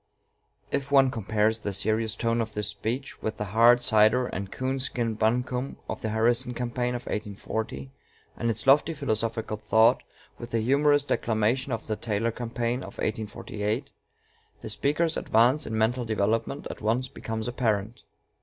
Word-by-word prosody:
If 140 Hz, 0 st, -2 dB
one 135 Hz, -2 st, +5 dB
compares 110 Hz, 0 st, 0 dB
the 100 Hz, -2 st, -4 dB
serious 110 Hz, +3 st, 0 dB
tone 115 Hz, 0 st, 0 dB
of 110 Hz, -1 st, -4 dB
this 105 Hz, 0 st, -1 dB
speech 125 Hz, +5 st, -4 dB
with 110 Hz, 0 st, -3 dB
the -, -, -2 dB
hard 115 Hz, +5 st, +5 dB
cider 110 Hz, +2 st, +4 dB
and 100 Hz, -4 st, -5 dB
coon 130 Hz, +1 st, -2 dB
skin 120 Hz, -3 st, -1 dB
buncombe 125 Hz, +4 st, -1 dB
of -, -, -5 dB
the 110 Hz, -, -2 dB
Harrison 120 Hz, +3 st, +1 dB
campaign 125 Hz, 0 st, -2 dB
of 120 Hz, -, -5 dB
1840, 100 Hz, -9 st, -4 dB, 0.4 s
and 115 Hz, -, -1 dB
its 110 Hz, -1 st, -2 dB
lofty 150 Hz, +4 st, +4 dB
philosophical 115 Hz, -5 st, -2 dB
thought 110 Hz, +1 st, +4 dB, 0.4 s
with 120 Hz, -, -7 dB
the 115 Hz, -, 0 dB
humorous 145 Hz, +4 st, +3 dB
declamation 120 Hz, +3 st, 0 dB
of 115 Hz, -2 st, -3 dB
the 110 Hz, -, -2 dB
Taylor 110 Hz, +1 st, -1 dB
campaign 120 Hz, +1 st, -2 dB
of -, -, -9 dB
1848, 105 Hz, 0 st, -3 dB, 0.7 s
the -, -, -5 dB
speaker's 150 Hz, +8 st, +1 dB
advance 125 Hz, +7 st, +3 dB
in 110 Hz, -, -2 dB
mental 120 Hz, +3 st, +1 dB
development 110 Hz, 0 st, -1 dB
at -, -, -10 dB
once 115 Hz, +4 st, 0 dB
becomes 110 Hz, 0 st, -5 dB
apparent. 115 Hz, -2 st, -1 dB
115 Hz, 155 wpm, -27 LUFS, 110-125 Hz, 0.7 s, one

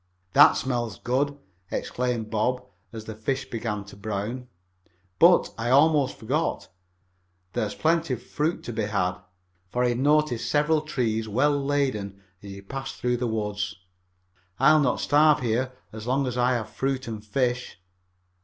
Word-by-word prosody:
"That -, -, +8 dB
smells 120 Hz, -5 st, -2 dB
good!" 140 Hz, +3 st, -1 dB, 0.3 s
exclaimed 120 Hz, -3 st, -2 dB
Bob, 125 Hz, +4 st, 0 dB, 0.3 s
as 110 Hz, -2 st, -8 dB
the 110 Hz, -, -6 dB
fish 130 Hz, +5 st, -3 dB
began 110 Hz, -3 st, -3 dB
to 95 Hz, -, -12 dB
brown. 110 Hz, +5 st, -4 dB, 0.7 s
"But, -, -, +5 dB
I 115 Hz, +1 st, -1 dB
almost 145 Hz, 0 st, +4 dB
forgot. 140 Hz, +9 st, -2 dB, 0.8 s
There's 105 Hz, -, -2 dB
plenty 160 Hz, -4 st, +1 dB
of 120 Hz, -, -14 dB
fruit 155 Hz, +3 st, -2 dB
to 120 Hz, -, -5 dB
be 110 Hz, -1 st, -1 dB
had." 90 Hz, -3 st, -1 dB, 0.5 s
For 125 Hz, +6 st, 0 dB
he 125 Hz, -, +3 dB
had 120 Hz, 0 st, -1 dB
noticed 150 Hz, -3 st, +2 dB
several 150 Hz, +1 st, +2 dB
trees 115 Hz, -7 st, -2 dB
well 140 Hz, +8 st, +3 dB
laden 135 Hz, -9 st, -1 dB, 0.2 s
as 100 Hz, -, -10 dB
he 100 Hz, 0 st, -8 dB
passed 135 Hz, +6 st, -6 dB
through 125 Hz, 0 st, 0 dB
the 120 Hz, 0 st, -1 dB
woods. 105 Hz, -2 st, -2 dB, 0.8 s
"I'll 155 Hz, +4 st, +6 dB
not 135 Hz, -4 st, +1 dB
starve 150 Hz, 0 st, +4 dB
here 125 Hz, +2 st, 0 dB, 0.2 s
as 110 Hz, +1 st, -8 dB
long 135 Hz, +2 st, +1 dB
as 125 Hz, -2 st, -3 dB
I 125 Hz, +1 st, +2 dB
have 110 Hz, -3 st, -2 dB
fruit 135 Hz, -1 st, -2 dB
and 110 Hz, -2 st, -6 dB
fish." 125 Hz, +1 st, -1 dB
125 Hz, 155 wpm, -26 LUFS, 110-135 Hz, 0.8 s, That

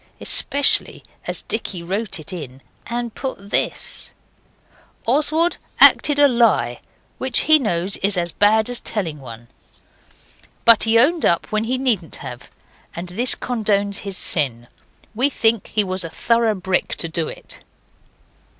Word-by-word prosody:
Especially 285 Hz, 0 st, +1 dB, 0.2 s
as -, -, -4 dB
Dicky 195 Hz, -5 st, -4 dB
wrote 195 Hz, +2 st, -4 dB
it 155 Hz, -, -8 dB
in 135 Hz, -6 st, -9 dB, 0.2 s
and 235 Hz, 0 st, -4 dB
put 205 Hz, -7 st, -7 dB
this: -, -, -2 dB, 1.0 s
'Oswald 310 Hz, +7 st, +1 dB, 0.2 s
acted 290 Hz, -1 st, +7 dB
a 290 Hz, 0 st, +6 dB
lie, 220 Hz, -, +1 dB, 0.4 s
which, 260 Hz, -1 st, +1 dB
he 310 Hz, 0 st, +6 dB
knows, 190 Hz, -6 st, -1 dB
is 200 Hz, 0 st, +1 dB
as 170 Hz, -1 st, -1 dB
bad 215 Hz, +3 st, +2 dB
as 245 Hz, -1 st, -2 dB
telling 165 Hz, -8 st, -4 dB
one. 120 Hz, -3 st, -11 dB, 1.2 s
But 230 Hz, -1 st, +6 dB
he 225 Hz, +1 st, +3 dB
owned 315 Hz, +8 st, +3 dB
up 170 Hz, -, +1 dB
when 215 Hz, +1 st, -1 dB
he 255 Hz, +3 st, -1 dB
needn't 225 Hz, -, -1 dB
have, -, -, -10 dB, 0.5 s
and 175 Hz, +1 st, -7 dB
this 235 Hz, +8 st, +1 dB
condones 205 Hz, -4 st, -1 dB
his 195 Hz, -2 st, -5 dB
sin. 120 Hz, -7 st, -1 dB, 0.5 s
We 255 Hz, +6 st, +2 dB
think 225 Hz, -5 st, +1 dB
he 210 Hz, -, +1 dB
was 185 Hz, -1 st, -4 dB
a 165 Hz, -, -6 dB
thorough 230 Hz, +5 st, 0 dB
brick 185 Hz, -1 st, -2 dB
to 165 Hz, -, -2 dB
do 160 Hz, 0 st, -3 dB
it. -, -, -10 dB
210 Hz, 145 wpm, -20 LUFS, 175-240 Hz, 1.2 s, acted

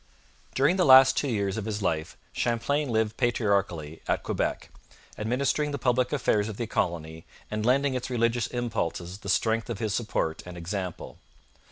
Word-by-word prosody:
During 145 Hz, +8 st, +3 dB
the 185 Hz, -, +3 dB
last 130 Hz, -2 st, +8 dB
two 145 Hz, -, 0 dB
years 100 Hz, -5 st, -1 dB
of 110 Hz, -, -3 dB
his 105 Hz, -2 st, -3 dB
life 80 Hz, -3 st, -2 dB, 0.2 s
Champlain 135 Hz, +5 st, 0 dB
lived 110 Hz, -1 st, 0 dB
patriarchally 100 Hz, -, 0 dB
at -, -, 0 dB
Quebec, -, -, -2 dB, 0.4 s
administering 135 Hz, +7 st, 0 dB
the 145 Hz, -, -3 dB
public 125 Hz, -1 st, +1 dB
affairs 110 Hz, -7 st, +1 dB
of 105 Hz, -, -7 dB
the 120 Hz, -, -2 dB
colony 80 Hz, -6 st, -2 dB, 0.3 s
and 105 Hz, 0 st, -2 dB
lending 135 Hz, +3 st, +2 dB
its 125 Hz, 0 st, -3 dB
religious 120 Hz, -1 st, +1 dB
impulses 100 Hz, -6 st, -3 dB
the 100 Hz, -, -7 dB
strength 115 Hz, +3 st, +1 dB
of 115 Hz, -, -3 dB
his 110 Hz, -1 st, -2 dB
support 105 Hz, -8 st, -1 dB
and 90 Hz, -1 st, -9 dB
example. 90 Hz, +1 st, -5 dB
110 Hz, 165 wpm, -27 LUFS, 100-125 Hz, 0.4 s, last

